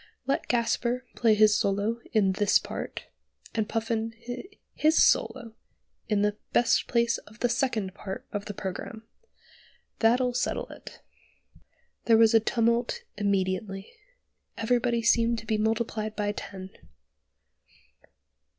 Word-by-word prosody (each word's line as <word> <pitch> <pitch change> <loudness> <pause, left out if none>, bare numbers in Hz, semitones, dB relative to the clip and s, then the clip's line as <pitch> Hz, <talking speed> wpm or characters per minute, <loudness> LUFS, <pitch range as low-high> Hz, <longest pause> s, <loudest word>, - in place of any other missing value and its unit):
Let 275 - -1
Gasper 240 +1 0
play 225 -2 +4
his 215 0 +5
solo 205 +4 0
in 205 -4 +3
this 200 +1 +3
part, - - -6 0.5
and 220 -2 -1
Puffin 225 0 -2 0.6
his 310 +1 +4
solo 240 -4 +1 0.6
in 205 -2 +2
the 210 0 0 0.2
best 240 - +3
place 235 -1 +1
of 215 +1 -17
the 245 - +2
second 235 -6 -1
part 190 -1 -7
of 205 -1 -4
the 205 - -5
programme. 210 +3 -6 1.0
That'll 245 +2 +3
settle 245 - -1
it." - - -12 1.0
There 225 -1 +5
was 225 0 +5
a 225 - +7
tumult 235 - 0
immediately; 195 - -1 0.6
everybody 235 0 +1
seemed 230 0 +3
to 225 - -7
be 220 -1 0
multiplied 220 -1 -1
by 205 -1 -1
ten. 190 -2 -8
225 Hz, 125 wpm, -27 LUFS, 205-235 Hz, 1.0 s, a